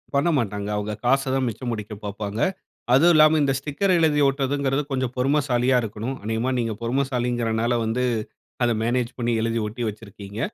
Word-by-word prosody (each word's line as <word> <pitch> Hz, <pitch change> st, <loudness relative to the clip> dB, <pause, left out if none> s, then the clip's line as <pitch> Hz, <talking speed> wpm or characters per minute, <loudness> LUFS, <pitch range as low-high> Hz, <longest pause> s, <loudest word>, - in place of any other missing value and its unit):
பண்ணமாட்டாங்க. 120 Hz, -, 0 dB
அவுக 105 Hz, +1 st, -3 dB
காசதான் 135 Hz, +1 st, +2 dB
மிச்சம் 120 Hz, +3 st, -5 dB
முடிக்க 105 Hz, -1 st, -5 dB
பாப்பாங்க. 105 Hz, +1 st, -4 dB, 0.5 s
அதுவும் 165 Hz, +7 st, +6 dB
இல்லாம 155 Hz, 0 st, +6 dB
இந்த 135 Hz, -1 st, +2 dB
ஸ்டிக்கர் 150 Hz, +8 st, 0 dB
எழுதி 155 Hz, -2 st, +3 dB
ஓட்டுறதுங்கிறது 135 Hz, 0 st, 0 dB
கொஞ்சம் 130 Hz, -2 st, -1 dB
பொறுமைசாலியா 130 Hz, -2 st, +2 dB
இருக்கணும். 110 Hz, +4 st, -4 dB
அநேகமாக 115 Hz, +4 st, -1 dB
நீங்க 115 Hz, -2 st, -1 dB
பொறுமைசாலிங்கிறனால 120 Hz, -2 st, 0 dB
வந்து 115 Hz, +3 st, 0 dB, 0.6 s
அத 120 Hz, -, +3 dB
மேனேஜ் 120 Hz, +1 st, 0 dB
பண்ணி 120 Hz, 0 st, 0 dB
எழுதி 115 Hz, 0 st, 0 dB
ஒட்டி 115 Hz, +3 st, -5 dB
வச்சிருக்கீங்க. 100 Hz, -1 st, -9 dB
125 Hz, 140 wpm, -23 LUFS, 110-135 Hz, 0.6 s, அதுவும்